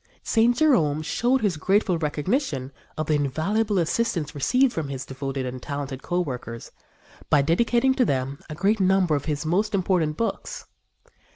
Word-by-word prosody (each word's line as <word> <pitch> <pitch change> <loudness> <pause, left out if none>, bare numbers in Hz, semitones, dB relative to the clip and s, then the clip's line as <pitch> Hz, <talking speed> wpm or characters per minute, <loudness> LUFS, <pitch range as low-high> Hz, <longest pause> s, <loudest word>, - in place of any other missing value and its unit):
St. 235 +1 +3
Jerome 160 - +3
showed 245 +10 +1
his 200 -7 0
grateful 190 +1 +1
recognition 150 - -1 0.3
of 155 - -1
the 155 - 0
invaluable 165 - 0
assistance 170 -3 0
received 250 - +2
from 155 -4 -3
his 135 -1 -5
devoted 135 0 -4
and 125 0 -6
talented 140 -2 -5
co 175 +1 -1
workers 125 -6 -6 0.6
by 145 - +4
dedicating 235 - +2
to 260 - +2
them 135 - -1
a 150 - -5
great 200 +6 +1
number 190 -3 +3
of 145 - -3
his 150 0 -2
most 200 +6 +1
important 175 -5 +1
books. 230 - -3
160 Hz, 160 wpm, -24 LUFS, 145-215 Hz, 0.6 s, by